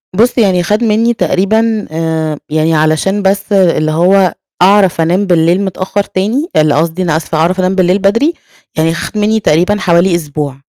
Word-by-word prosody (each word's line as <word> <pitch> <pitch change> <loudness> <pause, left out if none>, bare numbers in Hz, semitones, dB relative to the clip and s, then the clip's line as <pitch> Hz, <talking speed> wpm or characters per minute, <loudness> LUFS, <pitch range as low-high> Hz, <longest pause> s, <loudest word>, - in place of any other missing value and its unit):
بُص 240 +5 +1
يعني 185 -6 +2
خد 210 +6 -1
مني 225 +2 +1
تقريبًا 220 +3 0
آآ، 160 -2 -3
يعني 155 +1 0
علشان 155 +6 0
بس 195 +1 -1
اللي 170 -5 +2
هو 180 +3 +2 0.3
أعرف 190 -3 +3
أنام 180 +5 +1
بالليل 175 +1 +2
متأخر 190 +1 -3
تاني 230 - -2
اللي 155 -2 +2
قصدي، 165 +4 -1
أنا 160 -3 0
أسفة، 160 -1 -4
أعرف 175 +4 0
أنام 185 +1 0
بالليل 185 +1 +1
بدري 230 - +1 0.4
يعني 165 +1 +1
خد 170 +5 -6
مني 215 +1 +1
تقريبًا 180 +3 +1
حوالي 175 0 +2
أسبوع. 145 -4 -4
185 Hz, 170 wpm, -12 LUFS, 165-205 Hz, 0.4 s, أعرف